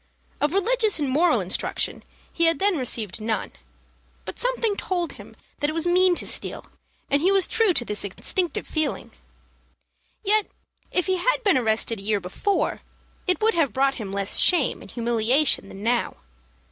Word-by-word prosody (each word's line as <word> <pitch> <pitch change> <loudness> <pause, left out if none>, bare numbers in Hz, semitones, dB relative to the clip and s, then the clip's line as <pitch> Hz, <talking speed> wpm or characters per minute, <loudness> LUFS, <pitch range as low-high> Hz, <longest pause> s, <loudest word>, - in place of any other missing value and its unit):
Of 295 +5 +1
religious 440 +1 +2
and 295 -3 -1
moral 310 +7 +2
instruction - - -2 0.3
he 335 - +2
had 330 0 +3
then 400 -1 +2
received 225 - -1
none; 220 0 -2 0.7
but - - -7
something - - +1
told 355 -4 -2
him - - -13 0.2
that 290 - 0
it - - -3
was 330 +1 0
mean 360 +1 +4
to - - -1
steal, - - 0 0.5
and 280 +1 +3
he 370 +4 +3
was 390 -2 +4
true 450 -4 +2
to 240 - +1
this 210 -2 -3
instinctive 335 - -2
feeling. 310 -1 -2 1.1
Yet, 425 +1 +2 0.4
if 360 - 0
he 375 -1 +1
had - - 0
been 400 -4 +3
arrested 225 -2 0
a - - -8
year 210 0 +1
before, 195 - -2 0.5
it 365 +2 +1
would 450 - +4
have 325 -6 +1
brought 270 -2 +1
him 200 - -6
less 195 0 +1
shame 340 -8 +3
and - - -12
humiliation 235 +1 +1
than 195 - -10
now. 240 +2 0
315 Hz, 170 wpm, -24 LUFS, 230-375 Hz, 1.1 s, mean